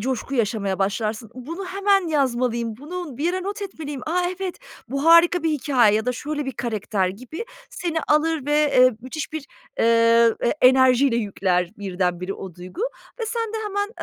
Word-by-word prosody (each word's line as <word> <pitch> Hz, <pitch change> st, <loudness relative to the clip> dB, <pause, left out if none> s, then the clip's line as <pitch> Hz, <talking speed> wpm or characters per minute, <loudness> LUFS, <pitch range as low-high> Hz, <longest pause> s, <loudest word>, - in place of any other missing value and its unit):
coşku 260 Hz, +3 st, -3 dB
yaşamaya 205 Hz, -4 st, 0 dB
başlarsın. 215 Hz, +3 st, -2 dB
"Bunu 330 Hz, +10 st, -6 dB
hemen 390 Hz, -2 st, +2 dB
yazmalıyım, 240 Hz, -6 st, 0 dB
bunu 305 Hz, +1 st, -7 dB
bir 300 Hz, -, -2 dB
yere 370 Hz, +2 st, 0 dB
not 405 Hz, +2 st, -4 dB
etmeliyim, 300 Hz, -8 st, -6 dB
a, 360 Hz, +3 st, +1 dB, 0.2 s
evet, 375 Hz, +2 st, -4 dB, 0.3 s
bu 275 Hz, +4 st, -2 dB
harika 335 Hz, +1 st, +6 dB
bir 325 Hz, -, +1 dB
hikâye." 255 Hz, -7 st, +3 dB
ya 220 Hz, +3 st, 0 dB
da 250 Hz, -, +1 dB
"Şöyle 295 Hz, +3 st, -4 dB
bir 265 Hz, -, -4 dB
karakter." 215 Hz, -5 st, -1 dB
gibi 255 Hz, -, -7 dB, 0.3 s
seni 335 Hz, -2 st, -2 dB
alır 305 Hz, -1 st, +2 dB
ve, 295 Hz, -, 0 dB, 0.2 s
eee, 255 Hz, 0 st, +7 dB
müthiş 260 Hz, +7 st, -6 dB
bir, 310 Hz, -2 st, -5 dB, 0.3 s
eee, 230 Hz, 0 st, +5 dB
e -, -, +1 dB
enerjiyle 260 Hz, -1 st, +5 dB
yükler 185 Hz, -5 st, 0 dB
birdenbire 180 Hz, -1 st, -2 dB
o 190 Hz, -3 st, -9 dB
duygu 180 Hz, -, -9 dB, 0.4 s
ve 455 Hz, -, -2 dB
sen 455 Hz, -1 st, -3 dB
de -, -, -2 dB
hemen, 405 Hz, 0 st, -1 dB
260 Hz, 170 wpm, -23 LUFS, 225-325 Hz, 0.4 s, eee